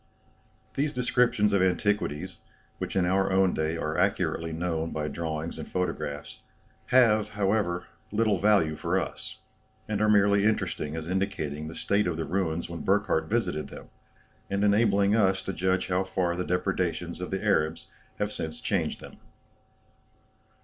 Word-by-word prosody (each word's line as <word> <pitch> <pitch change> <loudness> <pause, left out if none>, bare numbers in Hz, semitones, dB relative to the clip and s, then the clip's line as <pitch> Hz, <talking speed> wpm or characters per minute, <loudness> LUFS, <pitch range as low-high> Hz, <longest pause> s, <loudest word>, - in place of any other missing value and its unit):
These 145 +2 0
descriptions 120 -4 +2
of 100 - +3
antiquities, 95 -4 0 0.4
which - - -4
in 95 -2 +3
our 95 +2 +2
own 95 -1 +3
day 80 +1 -1
are 80 -1 -2
accurately 80 0 0
known 80 0 -2
by 75 -2 -3
drawings 80 0 -4
and - - -8
photographs, 75 -5 -3 0.5
have, 110 -4 +4
however, 95 -3 +1 0.3
little 105 -2 +2
value 95 -6 +3
for - - 0
us; - - -6 0.5
and 105 -1 -1
are 110 - +3
merely 100 -1 +4
interesting 95 -8 0
as 80 0 -5
indicating 85 -6 -2
the 80 - -8
state 100 0 +1
of 85 -3 -1
the 80 - -2
ruins 85 -3 -1
when 85 -2 -6
Burckhardt 95 -5 +1
visited 95 -9 0
them, - - -11 0.6
and 100 +1 0
enabling 100 -1 +3
us 95 -3 +2
to 95 - -4
judge 95 +1 0
how 90 +1 +2
far 90 -2 -1
the 90 - -2
depredations 90 -2 -1
of 90 - -4
the 95 +2 -3
Arabs 80 -6 +1 0.3
have 105 0 -1
since 80 -1 -4
changed - - -1
them. - - -11
95 Hz, 155 wpm, -27 LUFS, 80-105 Hz, 0.6 s, have